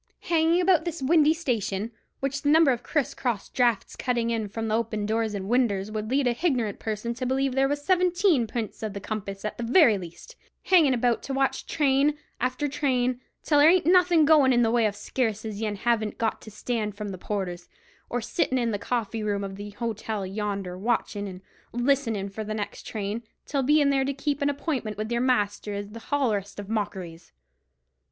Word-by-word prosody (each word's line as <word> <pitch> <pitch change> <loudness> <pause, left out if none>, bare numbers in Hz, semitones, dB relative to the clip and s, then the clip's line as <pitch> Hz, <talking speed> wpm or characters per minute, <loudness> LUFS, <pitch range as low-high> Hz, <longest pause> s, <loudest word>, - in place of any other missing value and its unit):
Hanging 330 +1 +2
about 355 -3 +4
this 340 -1 -4
windy 310 +2 +4
station, 225 - -2 0.3
which 275 +1 -2
the 290 - +1
number 315 -2 +6
of 245 -1 -1
criss 295 0 -1
cross 235 -6 -2
draughts 240 -5 +1
cuttin' 235 -2 -1
in 225 -2 -1
from 225 +1 -3
open 220 -2 -1
doors 220 0 0
and 195 -1 -4
winders 215 -4 +1
would 215 0 -4
lead 270 +2 +2
a 245 - +3
hignorant 245 - -1
person 220 +2 -3
to 255 +2 -4
believe 265 +1 +1
there 270 +1 +3
was 290 +1 -3
seventeen 360 - +3
p'ints 220 -1 -5
of 215 -2 -3
the 200 - -5
compass 200 -1 -5
at 215 - -4
the - - -2
very 235 - +5
least—hangin' 280 - 0
about 240 -1 +1
to 270 - -4
watch 270 0 0
train 290 0 +2 0.2
after 255 +4 -1
train, 255 -3 0 0.2
till 295 -2 +3
there 295 +2 +8
ain't 360 -1 +4
anything 350 -2 +5
goin' 290 -4 +6
in 240 -1 +4
the 225 - +2
way 235 -2 +3
of 205 - -4
sarce 220 0 -2
as 215 -1 -5
yen 210 -2 -1
haven't 220 0 0
got 225 -1 -1
to - - -10
stand 215 -1 -3
from 210 -1 -4
the 190 - -6
porters; 180 -4 -4 0.4
or 245 - -1
sittin' 260 +3 0
in 235 -2 0
the 205 - -2
coffee 225 -1 -2
room 205 -1 -1
of 195 -1 -5
the 205 +1 -7
hotel 220 -1 -4
yonder, 195 -2 -3
watchin' 210 -2 -1
and 185 -1 -9 0.3
listenin' 240 -5 +1
for 200 +2 -6
the 215 0 -4
next 205 -1 -5
train, 210 +1 -3 0.2
till 280 -1 -1
bein' 290 +1 +4
there 270 -1 +2
to 275 +1 -2
keep 285 0 -2
an 285 - +2
appointment 275 -7 -3
with 215 +2 -4
your 235 0 +1
master 210 -5 0
is 200 0 -5
the 230 - -8
hollerest 220 -9 0
of 205 0 -7
mockeries." 190 -6 -4
235 Hz, 200 wpm, -26 LUFS, 210-275 Hz, 0.4 s, there